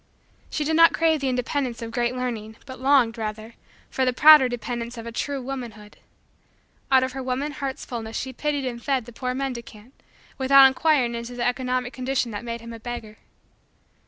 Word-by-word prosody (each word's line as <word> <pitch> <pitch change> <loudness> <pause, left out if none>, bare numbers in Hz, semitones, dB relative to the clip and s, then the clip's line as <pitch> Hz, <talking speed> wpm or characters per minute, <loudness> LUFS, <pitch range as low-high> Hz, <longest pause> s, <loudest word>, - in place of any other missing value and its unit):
She 300 - -2
did 315 +2 0
not 330 0 +6
crave 320 -1 +2
the 270 - 0
independence 250 0 -2
of 230 - -6
great 240 +1 -1
learning 225 -4 -4
but 260 -2 -10
longed, 260 -4 +3
rather, 220 +1 -5 0.4
for 265 - 0
the 255 - +2
prouder 295 0 +7
dependence 240 0 -5
of 230 - -7
a 235 - -6
true 280 +4 -3
womanhood. 240 -5 -7 0.9
Out 260 -1 +6
of 260 - -2
her 265 +1 -6
woman 260 +3 -2
heart's 275 -1 -5
fullness 225 -2 -5
she 260 0 -4
pitied 290 +1 -2
and 240 -2 -4
fed 270 -5 0
the 240 - -12
poor 250 +1 -3
mendicant 245 -3 -6 0.5
without 270 +1 +7
inquiring 265 -2 +3
into 235 +1 -6
the 240 0 -2
economic 250 0 -1
condition 255 -2 -1
that 205 +1 -6
made 235 -1 -5
him 230 0 -9
a 230 - -9
beggar. 225 -2 -7
250 Hz, 190 wpm, -24 LUFS, 235-270 Hz, 0.9 s, prouder